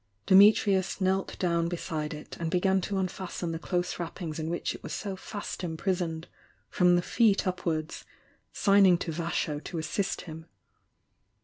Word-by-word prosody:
Di - - +2
mitrius 195 -1 +5
knelt 190 0 0
down 170 -2 +1
beside 160 -3 -3
it 150 0 -8
and 165 -1 -2
began 190 +2 +2
to 195 +2 -2
unfasten 185 -2 -3
the 165 - -4
close 180 +1 -2
wrappings 165 -2 -5
in 160 0 -3
which 170 - -2
it - - -10
was - - -6
so 200 -2 -4
fast 205 +1 -6
impris 180 +2 -1
oned, 165 -1 -4 0.5
from 180 -1 +4
the 175 - +1
feet 215 -2 +2
upwards, 170 -4 -2 0.5
signing 195 -3 +5
to 170 - -4
Vasho 160 -2 -2
to 170 - -6
assist 185 +5 -2
him. 160 -1 -10
175 Hz, 165 wpm, -28 LUFS, 165-190 Hz, 0.5 s, mitrius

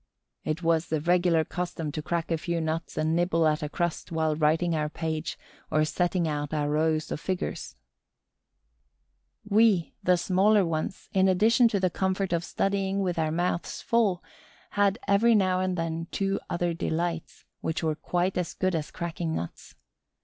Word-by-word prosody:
It 155 +3 -3
was 165 0 +2
the 155 - 0
regular 170 0 +3
custom 170 -4 -4
to 155 - -4
crack 170 +1 -2
a 165 - +2
few 170 +1 -2
nuts 160 +1 -3
and 155 +1 +1
nibble 170 -1 +2
at 155 0 +1
a 150 - -3
crust 175 +2 -2
while 160 -1 +1
writing 160 +3 +2
our 150 -1 -1
page 160 0 -3 0.3
or 155 0 +2
setting 175 +2 0
out 145 0 -2
our 145 -1 0
rows 155 +1 +1
of - - -2
figures. 185 +2 -4 1.7
We, 210 -4 +3
the 180 0 +3
smaller 195 +3 +3
ones, 165 +2 -3
in 190 -1 +4
addition 220 +6 +4
to 210 -3 0
the 185 -1 +1
comfort 190 -1 -1
of 170 0 0
studying 195 +1 -1
with 180 -3 -1
our 155 -1 +1
mouths 175 +1 -1
full, 215 -6 +1 0.5
had 200 0 +2
every 225 +4 +4
now 185 -3 +2
and 185 -1 -1
then 165 0 -3
two 195 0 -1
other 175 0 0
delights, 165 0 -3
which 160 +1 -3
were 160 -1 +1
quite 175 +4 -1
as 180 - -3
good 185 0 0
as 155 -2 -2
cracking 170 -1 -3
nuts. 85 - -7
170 Hz, 170 wpm, -27 LUFS, 160-185 Hz, 1.7 s, in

